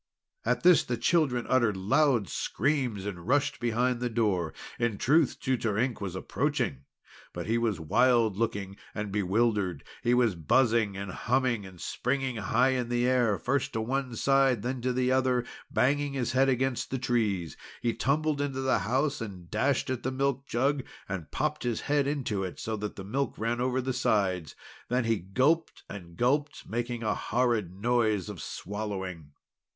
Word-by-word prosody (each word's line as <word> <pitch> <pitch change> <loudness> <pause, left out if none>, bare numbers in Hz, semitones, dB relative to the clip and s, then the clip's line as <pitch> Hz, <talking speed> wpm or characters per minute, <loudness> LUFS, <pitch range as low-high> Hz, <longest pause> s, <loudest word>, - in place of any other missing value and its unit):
At - - 0
this 180 -4 +7
the 120 - -2
children 125 -2 +2
uttered 115 -6 +2
loud 125 +2 +2
screams, 125 - -1
and 90 -3 -6
rushed 145 +2 +1
behind 120 +1 +1
the 125 0 -1
door. 105 -8 0 0.3
In 120 -3 0
truth, 150 +5 +3
Tutor 115 -5 0
Ink 120 0 0
was 95 -3 -4
approaching, 70 -6 -1 0.5
but - - -5
he 115 +1 +1
was 110 -6 0
wild 115 +5 +3
looking 100 -3 -2 0.2
and 105 -1 -3
bewildered. 105 -1 +1 0.2
He 120 0 +3
was 120 -4 +3
buzzing 110 - +2
and 100 -1 -5
humming, 120 -2 0
and 90 -2 -14
springing 130 +3 -2
high 120 +4 +2
in 125 -2 -1
the 120 0 +1
air, 120 -5 +3
first 135 +1 -1
to 110 - -1
one 130 +1 -2
side, 135 -3 +3
then 125 0 -2
to 130 +1 0
the 125 0 +1
other, 130 -1 +2
and 120 - -15 0.2
banging 145 +2 +1
his 125 -3 -1
head 135 +2 +3
against 130 -1 0
the 130 - -1
trees. 110 - 0 0.3
He 120 -1 +1
tumbled 150 +1 0
into 135 -2 -2
the 130 0 +2
house, 135 +5 0
and 95 -6 -8
dashed 130 +4 +1
at 130 -2 -2
the 130 - -1
milk 135 0 -1
jug, 135 +3 +1 0.2
and 95 -5 -5
popped 150 +1 -1
his 120 -3 -1
head 145 -1 +1
into 130 -9 -1
it 95 - -6
so 110 - -3
that 105 0 -5
the 95 - -7
milk 135 +8 -2
ran 115 +2 -1
over 130 +1 +1
the 130 +1 -2
sides. 95 - 0 0.3
Then 125 +1 +1
he 115 -1 +1
gulped 130 - +1
and 85 -4 -10
gulped, 145 +3 0
making 120 0 -3
a 110 - +1
horrid 115 -6 0
noise 110 0 +1
of 100 -5 -7
swallowing. 95 -7 -5
120 Hz, 175 wpm, -29 LUFS, 105-130 Hz, 0.5 s, this